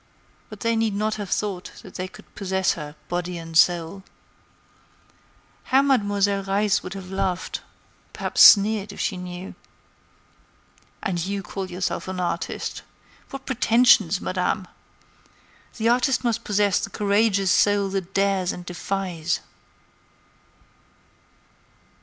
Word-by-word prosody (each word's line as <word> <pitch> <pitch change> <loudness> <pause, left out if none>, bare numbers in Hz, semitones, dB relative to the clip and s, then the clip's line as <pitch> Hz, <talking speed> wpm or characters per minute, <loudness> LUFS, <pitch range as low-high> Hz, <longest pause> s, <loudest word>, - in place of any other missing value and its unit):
But - - -11
they 230 -1 +1
need 225 -2 0
not 215 +1 0
have 205 -3 -5
thought 195 -4 -3
that 190 - -12
they 185 0 -4
could - - -16
possess 190 -1 0
her, 150 -2 -8
body 175 0 -3
and 165 -1 -9
soul. 175 +2 +3 1.6
How 270 +1 +4
Mademoiselle 205 -6 +2
Reisz 200 +1 +1
would 185 +1 -7
have 190 -1 -8
laughed, 190 -2 -2 0.5
perhaps - - -1
sneered, 210 0 +7
if - - -11
she 200 - -1
knew! 180 +1 -7 1.5
"And 175 -4 -1
you 195 +1 -3
call 190 +1 -5
yourself 180 +1 -3
an 185 0 -4
artist! 180 - -3 0.5
What 275 -1 -8
pretensions, 230 -6 +4
Madame! 185 +1 -2 1.1
The 230 0 +1
artist 250 +2 +2
must 235 -1 0
possess 205 -2 +2
the - - -4
courageous 200 -2 +2
soul 205 0 +3
that 190 -1 -4
dares 195 -2 +1
and 180 - -8
defies." 180 -2 -2
195 Hz, 125 wpm, -24 LUFS, 180-210 Hz, 1.6 s, sneered